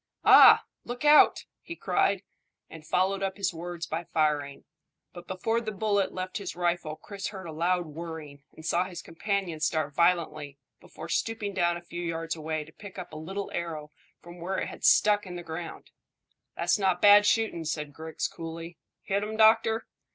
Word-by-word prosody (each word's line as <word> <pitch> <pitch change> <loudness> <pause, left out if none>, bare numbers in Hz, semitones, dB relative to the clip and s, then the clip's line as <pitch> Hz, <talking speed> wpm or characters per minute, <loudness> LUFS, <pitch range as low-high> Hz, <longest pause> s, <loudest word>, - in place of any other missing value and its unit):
"Ah, - - +9 0.2
look 245 +4 -6
out!" 300 +1 +6 0.2
he 335 - -8
cried, 195 - +1 0.5
and 155 -1 -11
followed 190 +3 +1
up 195 0 -2
his 195 -2 -1
words 170 0 -6
by 165 +2 -4
firing; 150 -3 -1 0.5
but 175 -1 -11
before 225 +5 -1
the 220 -2 -4
bullet 205 -1 0
left 185 +2 -4
his 200 - -6
rifle 175 -3 -1
Chris 200 +4 -7
heard 190 -3 -8
a 165 - -6
loud 175 +3 0
whirring 155 -2 -8
and 160 - -12
saw 175 +2 +1
his 180 -2 -8
companion 185 -1 -3
start 155 -1 -1
violently 155 -4 +1 0.2
before - - -10
stooping 220 -3 -2
down 175 -2 +1
a 175 - -12
few 170 0 -7
yards 165 -1 -3
away 155 -1 -3
to 155 - -16
pick 200 +4 -12
a 180 -4 -8
little 190 +6 -5
arrow 155 -3 -5 0.3
from 175 +1 -12
where 185 +3 -3
it - - -2
had - - -11
stuck 210 -1 +4
in 180 - -7
the 175 - -6
ground. 165 +1 -8 0.7
"That's - - +1
not 190 -3 +1
bad 205 +1 +7
shooting," 220 -7 +1
said 150 -2 -4
Griggs 160 +1 -4
coolly. 165 +1 -8 0.2
"Hit 200 0 0
him, 215 +1 -4
doctor?" 225 +1 +4
175 Hz, 180 wpm, -28 LUFS, 160-200 Hz, 0.7 s, Ah